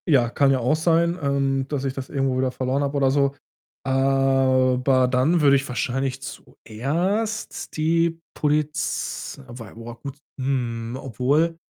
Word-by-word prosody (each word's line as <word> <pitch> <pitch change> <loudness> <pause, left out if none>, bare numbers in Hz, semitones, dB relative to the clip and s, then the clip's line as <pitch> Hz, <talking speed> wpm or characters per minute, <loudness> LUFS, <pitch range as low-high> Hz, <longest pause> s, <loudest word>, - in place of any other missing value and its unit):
Ja, 130 -7 +4
kann 140 +3 +3
ja 135 - +2
auch 125 +5 +2
sein, 170 +2 +2
ähm, 135 -1 0
dass 140 -2 -3
ich 135 - -1
das 130 -1 -6
irgendwo 135 -2 0
wieder 130 0 +1
verloren 130 +2 -1
habe, 140 0 -1
oder 135 -1 +3
so. 140 0 +2 0.5
Aber 130 -1 +3
dann 130 +7 +2
würde 140 -2 +6
ich 135 0 0
wahrscheinlich 135 +1 -2
zuerst 170 - -3
die 165 +1 +1 0.2
Poliz 150 0 -1
wobei 120 -4 -10
boah, 115 +1 -10
gut 140 -1 -7 0.2
hm, 120 -3 -2
obwohl, 145 +7 +1
135 Hz, 145 wpm, -23 LUFS, 130-150 Hz, 0.5 s, würde